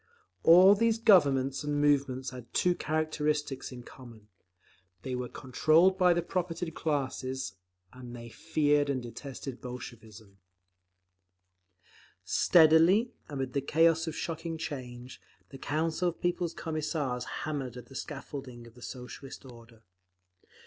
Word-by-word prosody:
All 180 +4 +8
these 225 +2 +2
"Governments" 140 - +4
and 145 0 -1
"movements" 135 -3 +1
had 125 -2 -11
two 180 - +3
characteristics 150 -4 -2
in 125 -1 -9
common; 115 -5 -14 0.7
they 130 - -4
were 125 -1 -3
controlled 155 +8 +3
by 180 -1 +5
the 175 0 +1
propertied 175 -2 -3
classes, 130 - -3 0.4
and 125 -1 -10
they 120 0 -9
feared 145 +2 +1
and 130 -3 -1
detested 125 +2 -8
Bolshevism…. 110 -5 -10 1.8
Steadily, 170 +8 +5 0.2
amid 135 -3 -4
the 140 - 0
chaos 165 +3 +3
of 160 - -4
shocking 165 0 -4
change, 125 -5 -7 0.3
the 135 - -11
Council 160 +5 0
of 170 - -9
People's 175 -1 -1
Commissars 150 -5 -3 0.2
hammered 135 -5 -4
at 125 - -9
the 135 - -16
scaffolding 135 -3 -7
of 115 - -15
the 125 - -17
Socialist 130 +2 -9
order. 115 -2 -15
140 Hz, 125 wpm, -30 LUFS, 125-160 Hz, 1.8 s, All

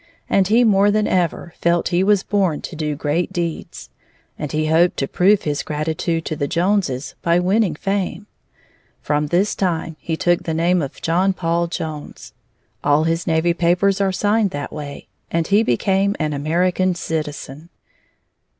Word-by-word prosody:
And 195 -2 +2
he 230 +4 +4
more 205 -2 +4
than 210 0 +2
ever 175 -2 -1
felt 170 0 +2
he 180 0 +2
was 200 -1 +3
born 190 -7 0
to 175 - -7
do 150 -1 -2
great 155 +4 -1
deeds. 170 -2 -5 0.4
And 150 - -5
he 155 0 0
hoped 165 +3 +3
to 135 - -1
prove 195 +6 +3
his 145 -1 -1
gratitude 160 +2 -2
to 155 - -3
the 145 -1 -2
Joneses 170 -6 0
by 170 0 +2
winning 185 -1 +1
fame. 195 +3 -2 0.8
From 150 0 0
this 180 +7 +1
time 165 -4 -2
he 160 -1 -3
took 175 +1 +2
the 160 - -3
name 175 +2 +2
of 140 - -6
John 185 +4 +2
Paul 170 -1 0
Jones. 155 -3 -7 0.5
All 145 +2 +3
his 165 +2 -1
navy 165 +1 +2
papers 180 +4 +2
are 195 -1 +2
signed 205 +2 +1
that 145 -4 -6
way. 145 -2 -7 0.2
And 165 0 0
he 200 +5 +3
became 195 - +1
an 155 -2 -1
American 175 +5 +1
citizen. 155 -1 -5
170 Hz, 165 wpm, -20 LUFS, 155-190 Hz, 0.8 s, he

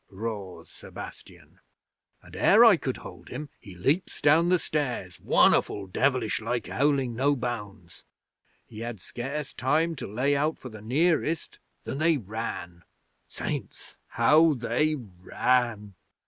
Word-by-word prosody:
roars 100 -2 -6
Sebastian, - - -12 0.6
and - - -14
ere - - +6
I - - +8
could - - -3
hold - - -11
him, 150 -1 -6
he 100 -6 -12
leaps 140 - 0
down 160 +4 +4
the 180 - +5
stairs 125 - -3
won'erful 100 - +3
devilish 120 +3 0
like 120 +2 -2
howling 140 -3 +1
no 140 +4 +2
bounds. 105 -8 -6 0.6
He 110 - -11
had 115 -2 -5
scarce 135 +9 -5
time 160 +6 +1
to - - -5
lay 135 +6 +1
out 150 +3 0
for 130 - -9
the 110 -2 -11
nearest 155 +6 0 0.2
than 135 - -5
they 160 0 +3
ran. 100 -6 -6 0.5
Saints, - - -6
how 155 0 +4
they 125 +6 0
ran! 110 0 -1
125 Hz, 135 wpm, -27 LUFS, 105-150 Hz, 0.6 s, I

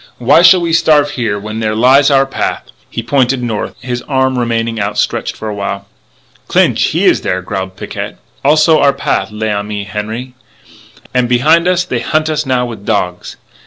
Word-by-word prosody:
Why 130 +7 +4
shall 180 +1 +6
we 170 -1 -1
starve 150 -3 +3
here 115 -6 -2
when 110 +2 -6
there 110 -1 -1
lies 130 +5 +5
our 135 -1 +4
path?" 135 - -3 0.3
He 115 - -5
pointed 130 0 +1
north; 110 -3 -3
his 125 -1 -3
arm 130 -2 +1
remained 115 -1 -1
outstretched 100 0 -1
for 110 - -6
a 105 - -3
while. 100 -1 -4 0.6
"Clinch, - - +2
he - - 0
is - - +3
there," 90 0 -2
growled 95 0 -5
Picquet. - - -6 0.3
"Also 155 +2 +4
our 140 -1 +4
path, 95 -7 -1
l'ami 105 -1 -3
Henri.... 110 +5 -5 0.8
And, 125 -1 +1
behind 155 +8 +3
us, 180 -1 +2
they 125 -9 -3
hunt 155 +6 0
us 155 -2 -2
now 125 -1 +1
with 115 -4 -8
dogs." 90 -3 -2
125 Hz, 175 wpm, -14 LUFS, 105-140 Hz, 0.8 s, shall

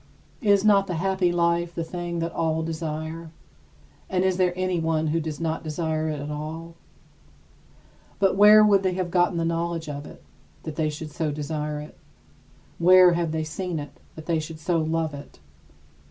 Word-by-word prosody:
Is 200 -3 +3
not 200 -2 +5
the 180 - -3
happy 190 +1 +1
life 170 0 0
the 165 - -2
thing 175 +1 -5
that 165 0 -2
all 160 0 0
desire, 160 0 -5 0.8
and 185 -1 +1
is 190 -1 +1
there 180 -1 +3
anyone 165 -4 0
who 160 +2 0
does 155 -2 -5
not 165 -1 -2
desire 155 0 -2
it 150 -2 -3
at 145 +1 -5
all? 160 +3 -6 1.4
But 195 -2 +2
where 210 +2 +8
would 200 -2 +5
they 185 -1 0
have 180 -2 -2
gotten 175 0 +2
the 165 - 0
knowledge 165 0 -2
of 145 0 -6
it, - - -14 0.4
that 155 -2 -6
they 155 -1 0
should 150 0 -7
so 160 0 -2
desire 150 0 -3
it? 150 - -11 0.8
Where 180 +1 +7
have 170 -2 -1
they 160 0 -1
seen 170 +2 -4
it 145 -1 -8 0.2
that 160 - -10
they 165 -2 0
should 155 0 -7
so 165 +1 0
love 160 -1 -1
it? 140 0 -10
165 Hz, 180 wpm, -25 LUFS, 155-180 Hz, 1.4 s, where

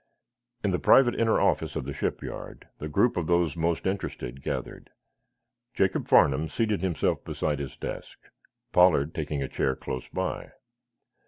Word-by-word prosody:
In 100 - +1
the 90 - 0
private 125 -3 +5
inner 115 -1 +2
office - - +1
of - - -3
the 70 - -4
shipyard - - -5
the 75 - -5
group 120 +10 +2
of 85 -3 -1
those 85 -4 +2
most 85 0 -1
interested 80 -9 -4
gathered. - - -5 0.9
Jacob 95 0 +1
Farnum 75 +3 +4
seated 105 0 0
himself 90 -5 0
beside 75 -2 -2
his 70 -2 -6
desk, - - -6 0.5
Pollard 80 -4 +4
taking 75 -2 -3
a - - -3
chair 65 0 -1
close 65 -1 -6
by. - - -4
80 Hz, 150 wpm, -27 LUFS, 70-95 Hz, 0.9 s, private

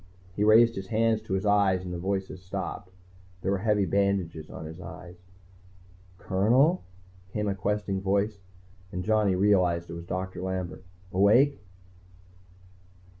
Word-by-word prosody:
He 105 - 0
raised 115 +2 +6
his 95 0 -6
hands 110 +1 +1
to 110 - -5
his 95 +2 -1
eyes 100 -3 +3
and 90 - -5
the 85 - -4
voices 95 0 -3
stopped. 90 0 -5 0.5
There 95 - 0
were 100 - 0
heavy 105 -1 +2
bandages 95 -5 0
on 80 - -8
his 80 +3 -9
eyes. 90 -1 -10 1.0
"Colonel?" 120 - +2 0.5
came 105 -1 -1
a 100 - +1
questing 100 0 -2
voice, 100 +2 0 0.5
and 90 -2 -4
Johnny 105 -2 +2
realized 90 -4 +2
it - - -6
was 85 0 -8
Doctor 90 0 -4
Lambert. 95 -1 -4 0.3
"Awake?" 110 +9 +4
95 Hz, 140 wpm, -27 LUFS, 90-105 Hz, 1.0 s, raised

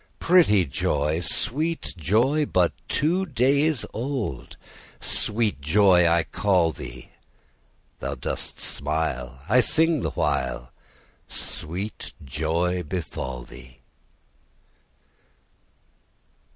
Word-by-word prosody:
Pretty 160 - +4
joy! 75 +3 0
Sweet 155 - -1
joy, 120 - +2
but 90 -2 +2
two 175 +6 +1
days 140 +1 +2
old. 120 - -4 0.4
Sweet 105 -6 0
joy 90 +3 +5
I 85 0 +3
call 90 -4 +2
thee: 65 -3 -10 0.9
Thou - - -3
dost - - -4
smile, 65 -5 -2
I 125 - +5
sing 160 +1 +2
the - - -1
while; 60 -1 -1 0.6
Sweet 95 +7 -5
joy 80 +5 0
befall 75 -7 -5
thee! 65 +1 -14
90 Hz, 85 wpm, -25 LUFS, -, 0.9 s, joy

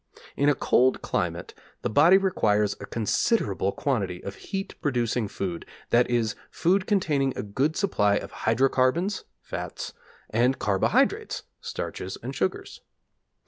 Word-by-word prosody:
In 140 +1 +3
a 145 - +3
cold 130 0 +2
climate - - -2 0.3
the - - 0
body 160 - +7
requires 105 - +2
a 100 - -8
considerable 105 - +1
quantity 100 -6 -1
of 100 - -5 0.2
heat 195 0 -3
producing 120 -5 0
food, 90 -4 -4 0.3
that 120 +1 +4
is, 115 -3 +1 0.2
food 185 +3 +1
containing 145 -10 +1
a - - -2
good 135 +10 0
supply 105 - +2
of - - -3
hydrocarbons 135 - +1 0.2
(fats), - - -5 0.4
and 125 +4 +2
carbohydrates 100 -2 +1 0.2
(starches 95 +1 -5
and 130 +3 -4
sugars). 95 -7 -3
125 Hz, 130 wpm, -26 LUFS, 105-150 Hz, 0.4 s, body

